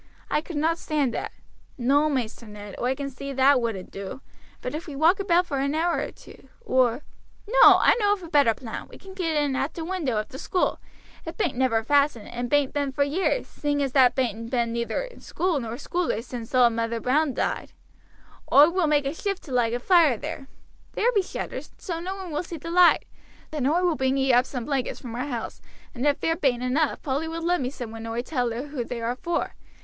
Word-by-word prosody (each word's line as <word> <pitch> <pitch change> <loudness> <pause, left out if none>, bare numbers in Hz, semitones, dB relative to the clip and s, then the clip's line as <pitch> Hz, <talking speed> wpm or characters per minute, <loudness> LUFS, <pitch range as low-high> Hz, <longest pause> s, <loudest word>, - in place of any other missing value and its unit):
I 300 - +2
could 330 +1 -8
not 325 +3 +1
stand 290 -6 0
that." - - -4 0.5
"No, 280 +5 +3
Maister 240 -4 -3
Ned, 210 -1 -9
oi 250 +2 +1
can 275 0 -5
see 275 +2 -6
that 265 0 +4
wouldn't 220 -6 -4
do; 195 +6 -7 0.4
but 250 - -5
if 315 +3 -5
we 295 - -7
walk 325 +7 +4
about 360 -2 +3
for 280 -6 -2
an 280 +2 0
hour 340 +2 +1
or - - -3
two, - - -16 0.2
or 255 - +2 0.4
no, - - +8
I - - +5
know 410 -2 +3
of 390 -3 -5
a - - -7
better 285 -8 +4
plan. 230 -2 -7
We - - -13
can 385 0 -12
get 340 -4 -1
in 290 -2 +1
at 275 +4 -2
t' 330 - -4
window 320 - -2
of 215 - -2
the 265 - -9
school; 365 - 0 0.4
it 325 - -7
bain't 345 - 0
never 240 -3 +1
fastened, 280 -3 +2
and 245 0 -4
bain't 290 -1 +2
been 285 -2 -1
for 280 +2 +1
years, 360 +12 0
seeing 290 -1 -1
as 270 - -1
thar 255 -2 +6
bain't 230 -3 -2
been 235 -2 0
neither 235 - -2
school 355 -5 -1
nor 230 -3 -5
schoolers 305 -3 -2
since 240 0 -6
auld 245 -2 +5
Mother 230 0 -1
Brown 275 +3 +1
died. - - -2 0.8
Oi 295 +4 +8
will 360 -2 +1
make 295 -2 +2
a 275 - -1
shift 395 +3 -3
to 285 - -11
light 240 -2 +1
a - - -2
fire 320 - +4
there. 270 - -6 0.5
There 480 +3 +2
be 405 - +4
shutters, 370 - -6
so 340 -6 -4
no 370 +3 -4
one 380 -3 -7
will 295 - -1
see 345 -1 -7
the 335 +3 -7
light. 355 0 +5 0.5
Then 290 -4 -1
oi 340 +5 +2
will 350 -3 +2
bring 265 -1 +1
ee 265 -1 +3
up 245 +1 +4
some 250 -4 -5
blankets 275 -4 -2
from 240 -3 -8
our 250 +4 -3
house, 240 -5 -5 0.3
and 255 +3 -1
if 285 - +2
there 325 - +1
bain't 255 -7 0
enough 280 +5 0
Polly 285 +3 -1
will 330 +1 -5
lend 350 -2 +1
me 250 - -1
some 245 -5 -7
when 225 0 -7
oi 230 +1 -2
tell 250 -3 -1
her 245 +6 -5
who 275 -4 -3
they 240 0 -5
are 230 +2 -2
for. 340 +6 -2
275 Hz, 230 wpm, -25 LUFS, 245-325 Hz, 0.8 s, no